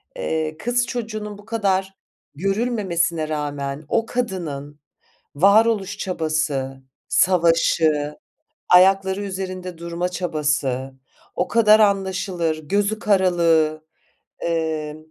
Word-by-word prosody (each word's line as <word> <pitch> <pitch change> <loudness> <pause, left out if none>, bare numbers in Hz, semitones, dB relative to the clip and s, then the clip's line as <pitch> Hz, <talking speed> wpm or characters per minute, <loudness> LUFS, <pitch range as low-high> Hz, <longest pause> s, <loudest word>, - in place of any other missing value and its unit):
eee, 160 - -2
kız 240 +6 0
çocuğunun 215 -3 -5
bu 205 - -16
kadar 195 -4 -1 0.4
görülmemesine 190 -6 0
rağmen 145 -1 -3
o 230 0 +1
kadının 160 - -4 0.6
varoluş 200 +3 +3
çabası, 155 -7 -2 0.3
savaşı, 165 -4 +2 0.5
ayakları 190 +2 +4
üzerinde 185 -2 -5
durma 170 +1 -3
çabası, 150 -7 -2 0.4
o 180 - -1
kadar 220 -2 +5
anlaşılır 190 -5 0
gözü 200 +7 -1
karalığı. 170 -6 +2 0.6
Eee, 160 -2 -2
180 Hz, 85 wpm, -22 LUFS, 155-200 Hz, 0.6 s, kadar